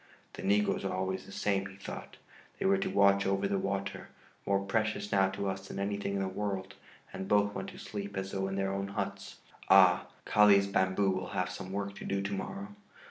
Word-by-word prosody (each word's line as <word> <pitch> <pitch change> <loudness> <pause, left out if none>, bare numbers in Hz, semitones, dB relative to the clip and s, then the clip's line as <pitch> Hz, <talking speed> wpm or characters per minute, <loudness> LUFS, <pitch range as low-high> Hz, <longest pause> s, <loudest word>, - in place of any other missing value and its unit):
"The - - -7
negroes 105 +1 +2
are 95 - -1
always 95 0 -2
the - - -11
same," 100 -1 0
he 95 - -12
thought; 100 - -8 0.4
"they - - -3
were 195 0 +4
to 195 0 -1
watch 100 - +4
over 100 0 +1
the 100 0 0
water, 100 0 -3 0.4
more 100 0 +2
precious 105 +1 -1
now 95 -1 +4
to 100 +1 -3
us 95 0 -4
than - - -7
anything 100 0 -2
in 100 - 0
the - - -1
world, 95 0 -3 0.4
and 95 - -5
both 105 0 +3
went 95 -1 -4
to - - -12
sleep 100 -1 -6
as 95 0 -3
though 95 0 -1
in 95 - -3
their 95 0 0
own 100 0 -2
huts. 100 - -4 0.3
Ah! 95 -2 +7 0.2
Kali's 105 -2 +6
bamboo 95 -1 +2
will 95 0 -2
have 90 0 0
some 95 0 -7
work 100 0 -3
to - - -8
do 100 - 0
to 100 +1 -2
morrow." 195 - -5
100 Hz, 215 wpm, -31 LUFS, 95-100 Hz, 0.4 s, Ah